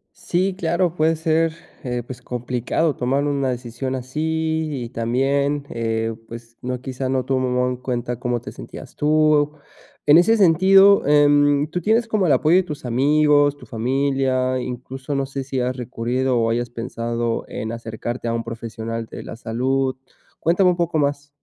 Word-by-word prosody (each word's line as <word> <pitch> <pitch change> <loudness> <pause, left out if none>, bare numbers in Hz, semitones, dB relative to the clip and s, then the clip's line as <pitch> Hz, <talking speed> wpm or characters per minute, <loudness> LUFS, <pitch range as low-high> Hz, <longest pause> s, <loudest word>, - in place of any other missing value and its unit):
Sí, 185 +2 -1
claro. 170 0 0
Puede 160 0 +3
ser, 160 0 +1 0.3
eh 125 -1 -2
pues, 125 0 -9
complicado 125 +5 -1
tomar 135 +3 0
una 140 -2 0
decisión 125 +1 -4
así. 160 +4 -2 0.2
Y - - -6
también, 140 +5 0
eh, 115 -1 -2
pues, 115 0 -11
no 125 0 -3
quizá 130 0 -4
no 130 -1 0
tomaba 125 -1 0
en 125 - -2
cuenta, 125 -1 -3
cómo 120 -1 -1
te - - -9
sentías - - -11
tú. 150 -1 +3 0.5
En 150 +3 +8
ese 225 +6 +4
sentido, 195 0 +6
em, 145 0 +4
¿tú 180 - -2
tienes 225 +5 +2
como 215 -4 +1
el 150 - +4
apoyo 155 +6 +4
de 190 - +5
tus 150 -6 -7
amigos, 145 +3 +3
tu 130 - -14
familia? 130 +1 0
Incluso, 130 +3 -5
no 135 -1 0
sé 135 0 -5
si 135 -1 -3
has 125 +1 -1
recurrido, 125 +1 -1
o 115 0 +1
hayas 120 +1 -1
pensado 115 0 -3
en 110 - -5
acercarte 115 +1 -5
a 115 - 0
un 115 0 -1
profesional 115 0 -5
de - - -9
la - - -8
salud. 130 +3 -1 0.4
Cuéntame 180 +3 +3
un 175 - 0
poco 170 -2 0
más. 145 0 -1
135 Hz, 170 wpm, -21 LUFS, 120-155 Hz, 0.5 s, En